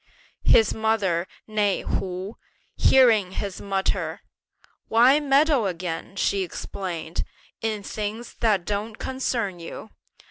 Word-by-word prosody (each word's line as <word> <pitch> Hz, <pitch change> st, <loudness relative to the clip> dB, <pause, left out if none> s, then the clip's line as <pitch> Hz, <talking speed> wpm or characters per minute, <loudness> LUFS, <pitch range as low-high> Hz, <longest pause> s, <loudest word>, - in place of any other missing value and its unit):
His 220 Hz, -3 st, +5 dB
mother, 205 Hz, -6 st, +1 dB, 0.2 s
née 210 Hz, -2 st, +1 dB
Hu, 185 Hz, +2 st, -3 dB, 0.4 s
hearing 220 Hz, -8 st, +5 dB
him 200 Hz, +1 st, -3 dB, 0.2 s
mutter; 195 Hz, -1 st, -1 dB, 0.7 s
"Why 245 Hz, +6 st, +5 dB
meddle 280 Hz, -4 st, +3 dB
again," 175 Hz, 0 st, -4 dB
she 200 Hz, 0 st, +1 dB
explained, 175 Hz, -2 st, -4 dB, 0.4 s
"in 215 Hz, -2 st, -2 dB
things 215 Hz, +3 st, -5 dB
that 205 Hz, -6 st, +2 dB
don't 210 Hz, +2 st, -3 dB
concern 235 Hz, -8 st, -2 dB
you? 170 Hz, +5 st, -8 dB
205 Hz, 105 wpm, -25 LUFS, 190-225 Hz, 0.7 s, His